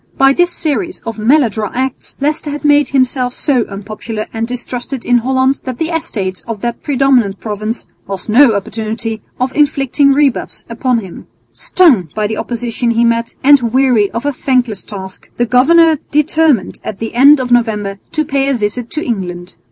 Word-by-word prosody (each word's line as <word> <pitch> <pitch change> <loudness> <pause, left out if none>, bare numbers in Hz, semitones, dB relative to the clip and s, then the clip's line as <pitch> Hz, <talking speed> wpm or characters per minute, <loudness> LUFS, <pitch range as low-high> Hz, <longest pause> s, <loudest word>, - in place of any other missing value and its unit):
By 270 0 +5
this 350 +3 +2
series 345 +3 -2
of 230 -1 -6
maladroit 225 -4 +1
acts 260 0 -4
Leicester 300 +2 -1
had 295 +1 -5
made 290 0 +4
himself 255 -2 0
so 260 -6 +1
unpopular 215 +2 -6
and 225 0 -2
distrusted 245 +1 -5
in 245 0 +3
Holland 260 +2 +1
that 255 -2 -5
the 320 +3 -2
Estates 210 - -3
of 225 -3 -5
that 235 0 -3
predominant 260 -8 +1
province 215 +2 -4 0.2
lost 195 -2 -5
no 235 +1 +5
opportunity 220 +2 -4 0.2
of 255 +1 -1
inflicting 280 -1 +2
rebuffs 275 -2 0
upon 240 0 0
him. 190 -4 -11 0.2
Stung 260 - +2
by 215 -1 0
the 215 +1 -2
opposition 240 0 -2
he 235 0 +2
met 230 0 0
and 285 0 +6
weary 250 -5 +3
of 230 +4 -5
a 290 - 0
thankless 250 -6 0
task, 190 -3 -9
the 240 - +2
governor 315 +6 +4
determined 300 - +1
at 210 - -5
the 225 +1 -5
end 280 +4 +6
of 250 -1 -3
November 210 -4 0
to 310 -1 0
pay 275 0 0
a 275 - +1
visit 230 +2 -3
to 310 - -4
England. 180 -5 -4
245 Hz, 175 wpm, -14 LUFS, 220-275 Hz, 0.2 s, and